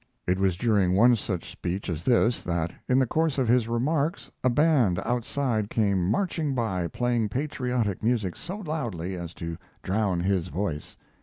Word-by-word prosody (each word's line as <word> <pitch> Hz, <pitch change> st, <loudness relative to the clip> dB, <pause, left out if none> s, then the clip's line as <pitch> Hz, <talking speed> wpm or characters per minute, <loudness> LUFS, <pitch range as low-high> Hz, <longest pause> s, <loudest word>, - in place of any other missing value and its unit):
It 90 Hz, +1 st, +1 dB
was 95 Hz, -3 st, +2 dB
during 100 Hz, -6 st, +2 dB
one 120 Hz, +5 st, +6 dB
such 95 Hz, -5 st, -4 dB
speech 95 Hz, +3 st, -4 dB
as 85 Hz, -3 st, -4 dB
this 120 Hz, -1 st, +3 dB
that, 85 Hz, -1 st, -1 dB, 0.2 s
in 125 Hz, -, +4 dB
the 130 Hz, -, +4 dB
course 155 Hz, +3 st, 0 dB
of 130 Hz, -3 st, +1 dB
his 120 Hz, -1 st, +3 dB
remarks, 140 Hz, +7 st, -1 dB
a 130 Hz, -, +4 dB
band 125 Hz, -, +3 dB
outside 120 Hz, -2 st, -1 dB
came 100 Hz, -6 st, +1 dB
marching 160 Hz, -, 0 dB
by 95 Hz, -8 st, -1 dB
playing 120 Hz, +3 st, 0 dB
patriotic 125 Hz, -5 st, -1 dB
music 110 Hz, -6 st, 0 dB
so 180 Hz, +4 st, -6 dB
loudly 120 Hz, -, -3 dB
as 85 Hz, -1 st, -7 dB
to 85 Hz, -1 st, -6 dB, 0.2 s
drown 95 Hz, -3 st, 0 dB
his 95 Hz, -2 st, 0 dB
voice. 85 Hz, -5 st, -4 dB
110 Hz, 165 wpm, -26 LUFS, 95-130 Hz, 0.2 s, one